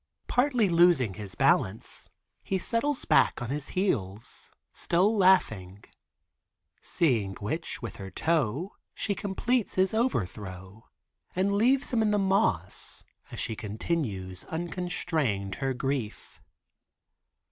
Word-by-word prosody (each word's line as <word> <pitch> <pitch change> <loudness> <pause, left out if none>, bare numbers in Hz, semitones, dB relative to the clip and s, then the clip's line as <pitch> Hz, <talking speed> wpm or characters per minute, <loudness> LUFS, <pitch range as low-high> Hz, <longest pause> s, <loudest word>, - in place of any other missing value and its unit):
Partly 245 -4 +2
losing 170 - +4
his 100 -1 -8
balance, 100 +4 +1 0.3
he 195 - -1
settles 240 +9 0
back - - +4
on 120 0 -4
his 145 0 -3
heels, 110 - -2 0.2
still 190 +6 +2
laughing, 110 - +2 1.0
seeing 115 - +1
which 125 +7 -4
with 115 - -6
her 95 -1 -7
toe 160 - 0 0.2
she 205 - -1
completes 210 +4 -1
his 190 +1 +3
overthrow 100 - -3 0.5
and 190 +2 +1
leaves 255 +6 +3
him 230 - +3
in 215 - +2
the 210 - +2
moss 190 - +1 0.3
as - - -6
she 110 - -2
continues 105 - -3
unconstrained 160 - -2
her 135 -1 0
grief. 130 -4 -4
160 Hz, 115 wpm, -28 LUFS, -, 1.0 s, losing